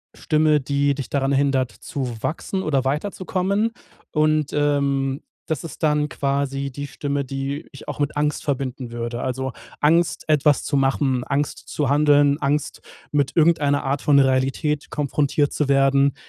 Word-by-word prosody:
Stimme, 155 -2 +2
die 140 +1 +1
dich 140 -3 -5
daran 140 -1 0
hindert, 135 -2 +1
zu 125 -8 -5
wachsen 190 +4 -2
oder 135 -4 0
weiterzukommen. 190 +7 -1 0.4
Und, 155 -1 +2
ähm, 140 -2 +1 0.3
das 160 -4 -2
ist 165 - -9
dann 150 -1 +2
quasi 140 0 -2
die 145 +2 -5
Stimme, 140 0 -3
die 135 +2 -4
ich - - -12
auch - - -5
mit 145 0 -1
Angst 150 0 0
verbinden 130 -3 -3
würde. 120 0 -4
Also 130 +1 -2 0.3
Angst, 165 +3 +2
etwas 150 -2 +3
zu 140 - 0
machen, 135 -1 +1
Angst 145 +1 -2
zu 145 -3 -1
handeln, 145 0 +4
Angst, 145 +1 -1 0.3
mit 145 -2 +1
irgendeiner 150 -3 +3
Art 140 +1 -1
von 145 -1 +5
Realität 135 +3 +1
konfrontiert 145 0 0
zu 150 - 0
werden, 135 0 +4
140 Hz, 150 wpm, -22 LUFS, 135-150 Hz, 0.4 s, von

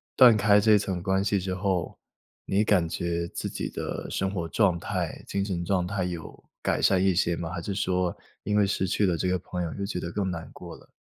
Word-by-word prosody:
断 120 -4 +8
开 105 0 +5
这 105 0 +5
层 95 -3 -2
关 95 +2 +1
系 100 0 +1
之 95 0 -3
后， 95 -3 -1 0.5
你 100 +2 +2
感 95 -5 +3
觉 85 +1 -2
自 - - -4
己 - - -4
的 - - -4
生 95 - 0
活 90 -4 -3
状 90 -1 +2
态、 90 -2 -3
精 100 - -1
神 90 -4 -3
状 90 -1 +1
态 95 0 -1
有 85 -3 -6 0.2
改 - - 0
善 95 -1 +3
一 95 -2 +3
些 85 -1 +2
吗？ 85 0 -4
还 90 - -4
是 100 - -3
说 90 -2 0 0.3
因 105 - -1
为 105 -1 +4
失 95 -1 0
去 100 +2 0
了 85 -2 +1
这 90 - -1
个 90 0 +2
朋 90 0 -4
友 85 - -4
就 100 - -5
觉 95 - -3
得 85 - -5
更 100 +1 -1
难 85 -2 -5
过 - - -9
了？ - - -17
95 Hz, 255 characters per minute, -27 LUFS, 85-100 Hz, 0.5 s, 断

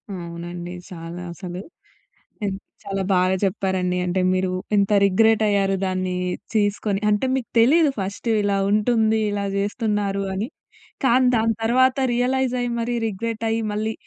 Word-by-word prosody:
అవునండి. 175 0 -7 0.2
చాలా 170 0 -7
అసలు. 180 0 -7 0.8
ఎ - - 0 0.4
చాలా 195 -1 -2
బాగా 185 +1 +3
చెప్పారండి. 185 -2 -1
అంటే 180 +1 0
మీరు 185 0 0 0.3
ఎంత 200 +1 +2
రిగ్రెటయ్యారు 205 -1 +3
దాన్ని 185 -1 -1 0.4
తీసుకొని 205 -1 +1
అంటే, 210 +4 +1
మీకు 255 -3 -3
తెలీదు 295 +5 +5
ఫస్ట్ 200 +4 -4
ఇలా 200 -1 +1
ఉంటుంది, 220 0 +2
ఇలా 200 -1 -2
చేస్తున్నారు 205 -1 -1
అని. 200 +4 -2 0.6
కానీ, 255 +1 +4
దాని 225 0 +2
తర్వాత 255 +3 +3 0.2
రియలైజయ్యి, 250 0 0
మరి 240 +1 -1
రిగ్రెటయ్యి 225 +2 -2
మళ్ళీ, 215 +1 -2
205 Hz, 125 wpm, -22 LUFS, 185-230 Hz, 0.8 s, తెలీదు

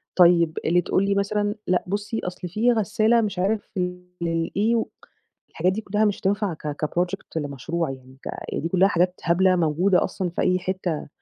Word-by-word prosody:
طيب 170 -3 +5
اللي 175 +2 +3
تقول 190 +3 +1
لي 200 0 +1
مثلًا 205 +1 0
لأ 180 -1 +2
بُصّي 205 +3 -2
أصل 180 0 -5
فيه 225 +7 +2
غسالة 220 +2 +2
مش 200 -4 -2
عارف 205 +3 -1
ل 180 0 -2 0.2
للإيه، 185 +7 0 0.7
الحاجات 180 +3 +1
دي 220 - -3
كلها 210 +2 +1
مش 205 - 0
هتنفع 200 -1 0
ك 150 0 -4
كproject 180 +4 -2
لمشروع، 150 +3 -2
يعني 130 0 -12
ك - - -5 0.3
دي 165 - -2
كلها 190 +2 +4
حاجات 180 -1 +1
هبلة 185 +2 +3
موجودة 175 +3 +2
أصلًا 185 -2 -2
في 170 - -3
أي 185 0 +2
حتة، 185 -4 -3
185 Hz, 175 wpm, -24 LUFS, 170-205 Hz, 0.7 s, طيب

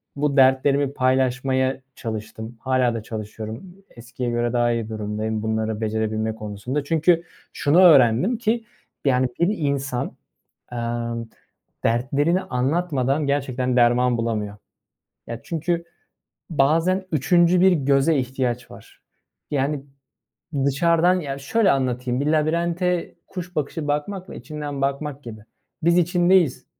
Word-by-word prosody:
bu 145 0 0
dertlerimi 135 +1 +4
paylaşmaya 130 0 +1
çalıştım. 110 +1 -6
Hâlâ 130 -2 +1
da 115 -2 -4
çalışıyorum, 110 - -7
eskiye 120 +1 -6
göre 120 0 -1
daha 120 -1 +2
iyi 115 -2 -2
durumdayım, 110 0 -3
bunları 110 0 -1
becerebilme 110 0 -1
konusunda. 110 +6 -4
Çünkü 165 +3 +2 0.3
şunu 155 +5 +3
öğrendim 150 - +5
ki, 230 0 0 0.4
yani, 130 -1 +3
bir 190 +5 +2
insan, 140 -4 -2 0.5
emm, 115 -1 -3 0.6
dertlerini 140 +9 +1
anlatmadan 140 -2 0
gerçekten 130 -3 0
derman 120 0 +4
bulamıyor. 105 -3 -2 0.7
Ya, 115 0 -6
çünkü 170 +1 -2 0.7
bazen 165 +6 +2
3'üncü 175 +4 +3
bir 190 +1 +6
göze 140 0 +2
ihtiyaç 125 -2 -2
var. - - -15 0.5
Yani, 140 0 0 0.8
dışarıdan, 170 +5 +3
ya, 140 -4 -5
şöyle 195 +9 +2
anlatayım, 125 -2 0
bir 145 - -1
labirente 170 +3 0
kuş 180 -1 -8
bakışı 150 +1 -2
bakmakla 180 +6 -3
içinden 145 +1 -6
bakmak 140 +1 -2
gibi. 110 -2 -8 0.4
Biz 170 +2 +4
içindeyiz 175 -3 +3
135 Hz, 115 wpm, -23 LUFS, 120-165 Hz, 0.8 s, bir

